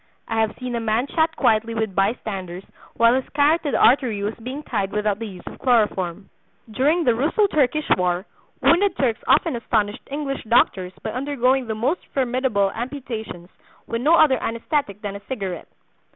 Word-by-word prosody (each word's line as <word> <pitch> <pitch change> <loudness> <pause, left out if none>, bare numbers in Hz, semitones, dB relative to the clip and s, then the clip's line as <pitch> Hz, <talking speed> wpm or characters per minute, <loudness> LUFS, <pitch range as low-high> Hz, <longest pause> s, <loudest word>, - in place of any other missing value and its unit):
I 225 0 0
have 220 -1 -1
seen 250 -1 -4
a 235 - -1
man 225 +2 0
chat 320 +2 0
quietly 225 +1 +1
with 220 -3 -2
bystanders 195 -3 -2 0.3
while 230 0 +5
his 260 0 -1
carotid 290 -2 +2
artery 235 -5 +3
was 210 +2 -1
being 260 +5 -6
tied 200 -7 -2
without 210 -1 -1
the 225 - -4
use 185 -3 -11
of - - -9
chloroform. 205 -6 0 0.4
During 300 +9 +2
the 245 - +3
Russo 300 - +2
Turkish 305 -4 +1
war 180 +1 -1 0.4
wounded 365 +2 +3
Turks 245 -4 0
often - - +3
astonished 215 -3 -1
English 280 -1 -4
doctors 190 -5 +2
by 220 - -3
undergoing 260 0 0
the 220 - -2
most 265 +11 -1
formidable 250 -6 +1
amputations 230 -8 -6 0.4
with 230 +1 -3
no 310 +6 +5
other 280 -7 +4
anaesthetic 230 - -2
than 200 -2 -5
a 200 - -8
cigarette. 195 -9 -5
230 Hz, 165 wpm, -22 LUFS, 210-275 Hz, 0.4 s, while